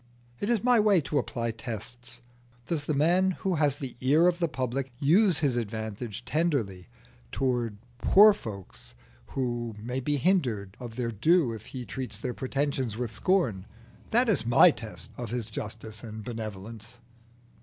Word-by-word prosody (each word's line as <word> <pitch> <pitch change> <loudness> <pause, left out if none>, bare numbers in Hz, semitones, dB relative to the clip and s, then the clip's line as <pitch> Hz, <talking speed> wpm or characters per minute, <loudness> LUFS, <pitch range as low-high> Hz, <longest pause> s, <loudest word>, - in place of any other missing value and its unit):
It 205 - -1
is 230 -4 +2
my 245 -1 +5
way 210 -3 +5
to 145 0 0
apply 115 -2 -2
tests. 120 +2 -7 0.4
Does 155 -4 -2
the 155 - 0
man 180 +5 +3
who 190 - +2
has 145 -2 +2
the 135 -4 -6
ear 145 +6 +4
of 175 0 +1
the 170 - +2
public 130 -1 -3
use 170 - +4
his 145 -6 +1
advantage 110 -1 -4
tenderly 125 - -1 0.4
towards 120 -5 0 0.2
poor 210 +2 +7
fellows 100 - -9 0.4
who 120 -3 -2
may 125 +4 -3
be 145 +3 0
hindered 125 - +1
of 120 -3 -8
their 120 -1 -2
due 130 - +3
if 110 -2 -9
he 125 -2 -6
treats 130 0 -5
their 125 -2 -4
pretensions 135 -4 -2
with 120 -2 -3
scorn? 115 - +1 0.4
That 240 +3 +3
is 215 - +2
my 125 +9 +7
test 95 - -8
of 120 -3 -5
his 115 -2 -3
justice 110 0 -6
and 110 -2 -7
benevolence." 110 0 -7
125 Hz, 160 wpm, -28 LUFS, 110-155 Hz, 0.4 s, poor